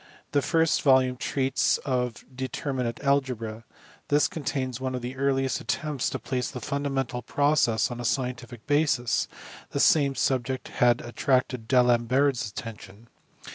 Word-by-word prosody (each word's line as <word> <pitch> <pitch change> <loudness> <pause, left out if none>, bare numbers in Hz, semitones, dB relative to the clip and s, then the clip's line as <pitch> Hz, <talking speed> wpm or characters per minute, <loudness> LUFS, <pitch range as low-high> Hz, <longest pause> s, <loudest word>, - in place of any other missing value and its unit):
The 145 - +2
first 165 +2 +2
volume 130 -3 +4
treats 130 +1 +1
of 125 -4 -2
determinate 130 -2 -3
algebra. 125 -6 -1 0.4
This 145 +1 +3
contains 130 -4 -3
one 130 -1 -2
of 125 - -5
the 125 +2 -5
earliest 135 0 0
attempts 150 -4 -2
to - - -3
place 125 -2 -3
the 125 - -6
fundamental 135 -2 -2
processes 135 -7 +2
on 120 - -5
a - - -4
scientific 120 -2 -3
basis: 145 -6 +1 0.4
the 140 - -3
same 140 -4 +4
subject 130 0 -1
had 120 -1 +3
attracted 125 -1 0
D 130 - +1
Alembert 125 +2 +3
a - - -3
attention. 105 0 -9
130 Hz, 140 wpm, -26 LUFS, 120-140 Hz, 0.4 s, volume